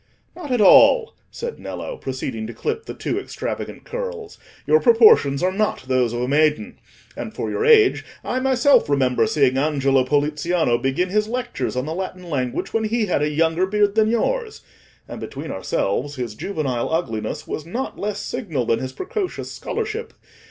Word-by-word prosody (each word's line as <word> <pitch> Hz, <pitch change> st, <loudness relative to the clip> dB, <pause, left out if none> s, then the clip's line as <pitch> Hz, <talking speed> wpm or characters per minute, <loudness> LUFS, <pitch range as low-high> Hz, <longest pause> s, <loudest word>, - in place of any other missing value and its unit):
"Not 345 Hz, -5 st, -8 dB
at 250 Hz, -3 st, +1 dB
all," 280 Hz, -, +6 dB, 0.2 s
said 475 Hz, 0 st, -6 dB
Nello, -, -, -6 dB
proceeding 130 Hz, -4 st, -5 dB
to 115 Hz, -, -8 dB
clip 450 Hz, 0 st, -3 dB
the -, -, -7 dB
too -, -, -2 dB
extravagant -, -, -6 dB
curls; 480 Hz, -3 st, -6 dB, 0.3 s
"your 460 Hz, -, +5 dB
proportions 440 Hz, -, +5 dB
are 185 Hz, -, +2 dB
not 210 Hz, -4 st, -1 dB
those 130 Hz, -3 st, +2 dB
of 120 Hz, 0 st, -3 dB
a -, -, -1 dB
maiden. 155 Hz, -, +1 dB, 0.4 s
And -, -, -7 dB
for -, -, -3 dB
your -, -, -1 dB
age, 440 Hz, -3 st, +5 dB, 0.2 s
I 255 Hz, -, -1 dB
myself 265 Hz, -, +3 dB
remember 135 Hz, -, +2 dB
seeing 135 Hz, -, +2 dB
Angelo 135 Hz, -3 st, +2 dB
Poliziano 150 Hz, 0 st, +1 dB
begin 135 Hz, +8 st, 0 dB
his 210 Hz, +2 st, +1 dB
lectures 245 Hz, -, -3 dB
on 125 Hz, +1 st, -1 dB
the 155 Hz, -, -3 dB
Latin 185 Hz, 0 st, -6 dB
language 125 Hz, -4 st, -2 dB
when 225 Hz, -1 st, +1 dB
he 225 Hz, +1 st, 0 dB
had 180 Hz, -7 st, 0 dB
a 150 Hz, -, +1 dB
younger 165 Hz, +4 st, +1 dB
beard 205 Hz, 0 st, +2 dB
than 220 Hz, 0 st, +3 dB
yours; 440 Hz, -, -1 dB, 0.4 s
and -, -, -8 dB
between -, -, -6 dB
ourselves, 145 Hz, -, -2 dB
his 120 Hz, -4 st, -4 dB
juvenile 135 Hz, -, -3 dB
ugliness 115 Hz, -10 st, -2 dB
was 155 Hz, -, -4 dB
not 245 Hz, +10 st, -4 dB
less 205 Hz, 0 st, -3 dB
signal 170 Hz, -, -3 dB
than 115 Hz, 0 st, +1 dB
his 130 Hz, 0 st, -5 dB
precocious 380 Hz, -, -4 dB
scholarship. 445 Hz, +1 st, -4 dB
180 Hz, 175 wpm, -21 LUFS, -, 0.4 s, all